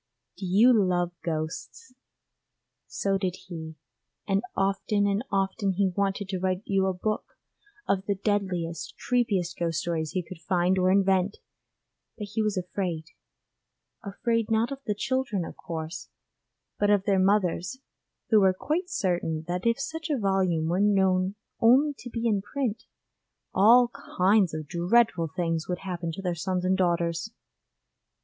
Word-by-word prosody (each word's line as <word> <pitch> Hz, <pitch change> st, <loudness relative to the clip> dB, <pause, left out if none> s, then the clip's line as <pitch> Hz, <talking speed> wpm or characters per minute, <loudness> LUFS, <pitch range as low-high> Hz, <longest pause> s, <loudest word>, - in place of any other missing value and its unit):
Do 190 Hz, 0 st, -5 dB
you 215 Hz, +8 st, +6 dB
love 180 Hz, -5 st, +2 dB
ghosts? 160 Hz, +10 st, -5 dB, 0.9 s
So 195 Hz, -1 st, -1 dB
did 185 Hz, -2 st, -1 dB
he, 160 Hz, -3 st, -7 dB, 0.5 s
and 195 Hz, -1 st, +2 dB
often 195 Hz, +1 st, +1 dB
and 200 Hz, +2 st, +1 dB
often 195 Hz, 0 st, 0 dB
he 195 Hz, +1 st, +2 dB
wanted 200 Hz, 0 st, 0 dB
to 190 Hz, -2 st, -2 dB
write 185 Hz, +1 st, -1 dB
you 195 Hz, -1 st, +1 dB
a 190 Hz, -, +1 dB
book 215 Hz, +4 st, -3 dB, 0.5 s
of 195 Hz, 0 st, 0 dB
the 200 Hz, -, +1 dB
deadliest, 185 Hz, -5 st, -2 dB
creepiest 210 Hz, -8 st, 0 dB
ghost 165 Hz, -2 st, 0 dB
stories 160 Hz, -3 st, -2 dB
he 185 Hz, -2 st, -1 dB
could 180 Hz, +1 st, -10 dB
find 180 Hz, +1 st, +1 dB
or 185 Hz, 0 st, +3 dB
invent, 195 Hz, 0 st, +2 dB, 0.8 s
but 210 Hz, -3 st, -6 dB
he 225 Hz, -, +1 dB
was 215 Hz, -2 st, 0 dB
afraid: 180 Hz, -3 st, -3 dB, 0.9 s
afraid 230 Hz, +2 st, -1 dB
not 225 Hz, +3 st, +1 dB
of 275 Hz, -, -5 dB
the 210 Hz, -, 0 dB
children 220 Hz, -6 st, -1 dB
of -, -, -9 dB
course, 160 Hz, 0 st, -6 dB, 0.7 s
but 205 Hz, -, +2 dB
of 205 Hz, -2 st, +4 dB
their 195 Hz, -2 st, +2 dB
mothers, 185 Hz, +1 st, +1 dB, 0.5 s
who 220 Hz, -, +7 dB
were 190 Hz, -1 st, +5 dB
quite 335 Hz, -, -2 dB
certain 175 Hz, -, -1 dB
that 180 Hz, +5 st, -1 dB
if 230 Hz, +3 st, +2 dB
such 320 Hz, +4 st, -4 dB
a 290 Hz, -, +1 dB
volume 190 Hz, -6 st, +1 dB
were 175 Hz, +4 st, +1 dB
known 190 Hz, -2 st, +2 dB, 0.2 s
only 265 Hz, +6 st, +5 dB
to 245 Hz, -, -8 dB
be 230 Hz, 0 st, -4 dB
in 210 Hz, -4 st, +2 dB
print, 235 Hz, +1 st, -3 dB, 0.7 s
all 235 Hz, +5 st, +6 dB, 0.3 s
kinds 190 Hz, -1 st, +4 dB
of 155 Hz, -1 st, -4 dB
dreadful 175 Hz, +1 st, +2 dB
things 165 Hz, -2 st, -1 dB
would 180 Hz, 0 st, -2 dB
happen 175 Hz, -3 st, -4 dB
to 195 Hz, +4 st, -7 dB
their 180 Hz, -2 st, 0 dB
sons 180 Hz, +2 st, -2 dB
and 185 Hz, +1 st, +3 dB
daughters. 170 Hz, +1 st, 0 dB
190 Hz, 155 wpm, -27 LUFS, 175-210 Hz, 0.9 s, who